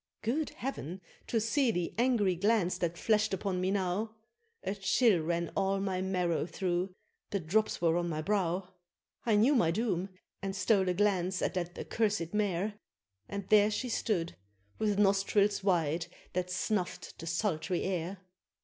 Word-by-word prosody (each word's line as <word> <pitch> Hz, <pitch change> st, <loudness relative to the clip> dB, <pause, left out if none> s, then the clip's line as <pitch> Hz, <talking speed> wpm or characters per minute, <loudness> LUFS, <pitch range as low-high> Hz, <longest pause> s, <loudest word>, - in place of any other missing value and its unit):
Good 285 Hz, +8 st, 0 dB
Heav'n! 190 Hz, -, -4 dB, 0.3 s
to 230 Hz, -, +1 dB
see 240 Hz, +4 st, +2 dB
the 175 Hz, -6 st, -1 dB
angry 230 Hz, -6 st, +2 dB
glance 185 Hz, -1 st, +2 dB
that 170 Hz, -1 st, -1 dB
flashed 215 Hz, -1 st, +2 dB
upon 185 Hz, -1 st, -2 dB
me 185 Hz, -, +1 dB
now! 200 Hz, +3 st, -1 dB, 0.5 s
A 195 Hz, -, -1 dB
chill 200 Hz, -1 st, +3 dB
ran 170 Hz, +1 st, -1 dB
all 195 Hz, 0 st, +1 dB
my 190 Hz, -2 st, -1 dB
marrow 180 Hz, -4 st, 0 dB
through 180 Hz, 0 st, -2 dB, 0.3 s
the 200 Hz, -, -1 dB
drops 190 Hz, +3 st, 0 dB
were 165 Hz, -1 st, +4 dB
on 175 Hz, 0 st, -1 dB
my 155 Hz, -2 st, -2 dB
brow! 185 Hz, -1 st, 0 dB, 0.6 s
I 220 Hz, -, +4 dB
knew 230 Hz, +8 st, +5 dB
my 230 Hz, -, +4 dB
doom, 195 Hz, -1 st, 0 dB, 0.3 s
and 195 Hz, 0 st, -3 dB
stole 190 Hz, 0 st, +3 dB
a 180 Hz, -, +1 dB
glance 190 Hz, -2 st, +1 dB
at -, -, 0 dB
that 175 Hz, -1 st, -3 dB
accursed 210 Hz, -6 st, -1 dB
Mare, 205 Hz, 0 st, 0 dB, 0.5 s
And 200 Hz, -2 st, -5 dB
there 210 Hz, -1 st, +6 dB
she 245 Hz, +4 st, -2 dB
stood, 180 Hz, -7 st, -1 dB, 0.4 s
with 210 Hz, -2 st, +1 dB
nostrils 200 Hz, 0 st, +3 dB
wide, 165 Hz, -4 st, +1 dB, 0.3 s
that 180 Hz, 0 st, -1 dB
snuff'd 185 Hz, 0 st, -2 dB
the 165 Hz, -, -7 dB
sultry 170 Hz, 0 st, 0 dB
air. 185 Hz, 0 st, -2 dB
195 Hz, 160 wpm, -31 LUFS, 175-210 Hz, 0.6 s, there